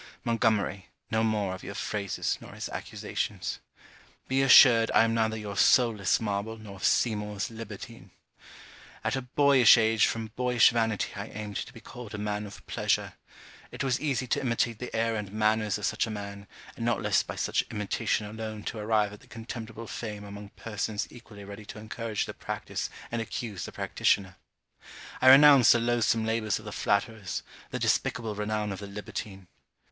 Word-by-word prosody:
Montgomery, 110 -4 0 0.2
no 110 0 +2
more 105 -4 0
of 95 - -8
your 100 - -7
phrases, 100 -2 -2
nor - - -11
his - - -5
accusations. - - -4 0.7
Be 135 +1 +2
assured 125 -4 +8
I - - +7
am 115 0 +1
neither 110 -1 +1
your 105 -2 -6
soul 120 +2 +5
less 95 -2 +2
marble, 105 +1 -3
nor 100 -3 -11
Seymour's 105 -2 0
libertine. 115 -1 -9 0.9
At - - 0
a 130 - -2
boyish 130 -1 +6
age 110 -1 +4
from 110 -2 -4
boyish 125 -2 +4
vanity 115 -3 0
I 100 +1 -5
aimed 105 -2 -6
to - - -5
be - - -13
called 120 -4 -9
a - - -4
man 105 0 -3
of 100 - -13
pleasure. - - 0 0.6
It - - -5
was 130 -3 0
easy 135 -4 0
to 140 +3 0
imitate 115 -3 0
the 125 - -5
air 115 0 +1
and 105 -3 -4
manners 110 0 +1
of 105 - -3
such - - 0
a - - -5
man, 100 -1 -7 0.3
and - - -6
not - - +1
less - - +3
by - - -7
such - - +1
imitation 105 +1 -1
alone 110 0 -6
to 110 - -5
arrive 105 -1 +1
at 105 - -11
the - - -20
contemptible 115 0 -7
fame 105 -2 -6
among 100 0 -9
persons 105 -1 -3
equally 110 -4 -12
ready 100 +1 -9
to 100 - -9
encourage 110 0 -3
the - - -7
practice - - -4 0.2
and 115 -1 -1
accuse 110 -4 -5
the - - -8
practitioner. 95 -3 0 0.8
I 130 - +7
renounce 140 -2 +9
the 120 - +2
loathsome 115 -1 +1
labours 110 -2 0
of 110 - -11
the 105 - -6
flatterers, 100 -1 -1 0.3
the - - -3
despicable 115 -3 0
renown 105 0 -2
of 95 - -5
the 100 - -7
libertine. 100 -2 -7
110 Hz, 180 wpm, -28 LUFS, 105-115 Hz, 0.9 s, renounce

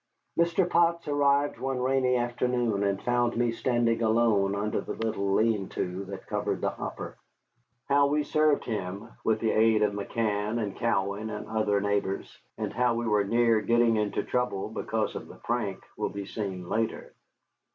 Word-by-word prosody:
Mr. 170 +2 +2
Potts 170 -1 +2
arrived 145 0 +2
one 135 -1 -2
rainy 130 0 +2
afternoon 120 -3 0
and 100 -1 0
found 120 -1 +1
me 120 -1 +2
standing 115 -1 +1
alone 110 -3 +3
under 105 +1 -1
the - - -5
little 100 -3 -1
lean 110 -3 +1
to 90 +2 -3
that 95 0 -8
covered - - -2
the - - 0
hopper. - - -7 0.7
How 140 0 +4
we 150 +1 +1
served 155 0 +2
him, 105 0 -4
with 110 -1 +2
the 110 -1 +1
aid 110 -1 +4
of 105 -1 +1
McCann 105 +1 -1
and 105 -3 -3
Cowan 105 -2 -1
and 105 -1 -6
other 110 -2 +1
neighbors, 100 -1 -1 0.2
and - - -3
how 120 +1 +2
we 120 0 -2
were 105 -2 +3
near 115 +1 +3
getting 115 +2 +3
into 105 -1 0
trouble 125 -6 -1
because - - -2
of - - -6
the - - -12
prank, 105 -5 -3
will - - -2
be 100 0 -6
seen 95 -4 -5
later. 110 +3 -2
115 Hz, 170 wpm, -28 LUFS, 100-125 Hz, 0.7 s, How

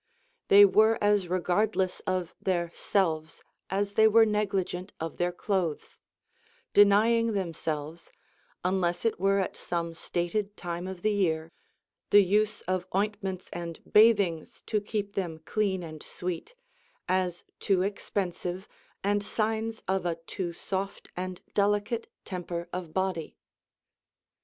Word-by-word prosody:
They 205 +1 +9
were 220 +3 +5
as 205 -3 +3
regardless 185 +1 +1
of 185 -2 -1
their 175 -3 0
selves 160 -5 -1 0.3
as 200 +1 -1
they 220 +1 +6
were 225 +1 +6
negligent 195 -3 -1
of 165 -1 -5
their 175 0 +1
clothes, 175 -3 -2 0.7
denying 220 +3 +5
themselves 165 -4 -4 0.5
(unless 180 -1 0
it 225 - +1
were 195 +1 +3
at 195 - -1
some 170 -1 -3
stated 195 +5 -2
time 175 0 -4
of 190 -2 -7
the 215 - +3
year) 165 -5 0 0.6
the 205 0 +7
use 210 +3 +1
of 185 -1 -2
ointments 195 -2 -1
and 170 -1 -5
bathings 200 -7 +3
to 210 -2 0
keep 205 -1 -3
them 175 -5 -2
clean 195 -4 0
and 155 -2 -8
sweet, 180 - -5 0.5
as 180 -1 0 0.2
too 190 -2 +2
expensive 190 -2 -3 0.4
and 205 +1 +2
signs 220 +1 -2
of 190 -1 0
a 170 - 0
too 175 -1 -3
soft 195 +3 -4
and 180 0 -5
delicate 205 +3 +1 0.2
temper 175 -2 -4
of 175 -3 -4
body. 185 -3 -2
190 Hz, 130 wpm, -28 LUFS, 175-205 Hz, 0.7 s, They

